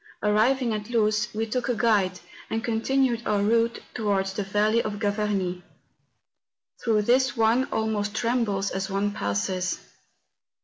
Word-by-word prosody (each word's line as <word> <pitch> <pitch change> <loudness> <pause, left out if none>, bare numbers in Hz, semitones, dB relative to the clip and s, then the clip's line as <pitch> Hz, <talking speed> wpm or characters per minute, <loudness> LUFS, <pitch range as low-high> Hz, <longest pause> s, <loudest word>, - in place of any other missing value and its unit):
Arriving 230 +4 +2
at 210 +1 -4
Luz, 215 -1 +2
we 220 +1 -2
took 250 +3 -2
a 245 - +1
guide, 205 -5 +1 0.3
and 225 0 -2
continued 240 +1 +1
our 205 -1 +1
route 230 +2 +1
towards 195 -4 0
the 205 - -2
valley 210 +3 +2
of 210 -2 -4
Gravarnie. 205 -4 -1 1.2
Through 220 -3 +2
this 260 +3 +2
one 230 +3 +3
almost 215 -3 -2
trembles 230 -5 0
as 190 0 -3
one 200 +1 0
passes. 180 - -2
215 Hz, 135 wpm, -26 LUFS, 200-230 Hz, 1.2 s, one